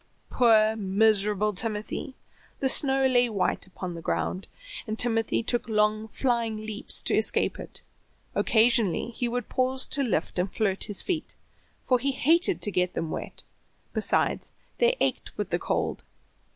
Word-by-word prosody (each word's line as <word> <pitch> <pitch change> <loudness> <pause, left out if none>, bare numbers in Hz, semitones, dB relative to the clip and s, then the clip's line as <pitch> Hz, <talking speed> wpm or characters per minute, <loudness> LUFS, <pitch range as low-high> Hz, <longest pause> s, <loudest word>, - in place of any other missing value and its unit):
Poor, 220 -3 +4
miserable 210 0 +1
Timothy! 215 +5 -3 0.4
The 265 - +1
snow 270 0 +4
lay 245 -2 +3
white 200 -2 -1
upon 185 -1 -7
the 165 - -8
ground, 185 +3 -2 0.4
and 215 0 -3
Timothy 225 -1 +1
took 240 0 0
long 215 0 +1
flying 235 -2 -1
leaps 215 0 -5
to - - 0
escape - - +1
it. - - -9 0.5
Occasionally 230 -2 +2
he 240 +1 -3
would 245 -1 -3
pause 260 +1 0
to 280 - +1
lift 210 - -1
and 180 +2 -1
flirt 200 -4 +1
his 205 - -1
feet, 335 -5 -3 0.5
for 250 -1 +2
he 275 +2 -1
hated 335 +8 +2
to 205 - +5
get 180 -1 0
them 165 -1 -3
wet; - - -7 0.5
besides, - - 0 0.3
they 485 +1 +3
ached - - -2
with - - -4
the - - 0
cold. - - -2
220 Hz, 150 wpm, -26 LUFS, 210-255 Hz, 0.5 s, to